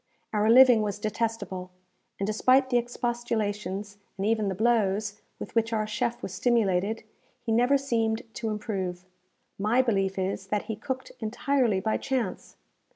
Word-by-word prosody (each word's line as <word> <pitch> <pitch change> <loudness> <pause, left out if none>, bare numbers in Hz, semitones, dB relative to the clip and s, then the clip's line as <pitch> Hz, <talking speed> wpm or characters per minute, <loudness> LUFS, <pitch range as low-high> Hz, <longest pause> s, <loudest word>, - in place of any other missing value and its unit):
Our 210 +1 +2
living 245 -1 +8
was 205 -2 -2
detestable; 215 -4 -3 0.5
and 195 - 0
despite 255 +5 +3
the 245 - +4
expostulations, 210 -4 -3 0.2
and 195 - -2
even 220 -1 +1
the 190 - -2
blows, 210 -2 +1 0.2
with - - -8
which 230 0 +1
our 215 -1 +1
chef 235 +3 -2
was 190 - -5
stimulated, 215 -1 +1 0.4
he 235 - -2
never 245 +5 +4
seemed 230 -4 0
to 225 - -3
improve. 190 -4 -3 0.5
My 225 +6 +3
belief 195 -5 0
is, 190 0 -2
that 210 +1 -1
he 220 - -4
cooked 260 +4 -5
entirely 235 -1 +1
by 220 +3 0
chance. 250 -8 -3
220 Hz, 150 wpm, -27 LUFS, 200-240 Hz, 0.5 s, living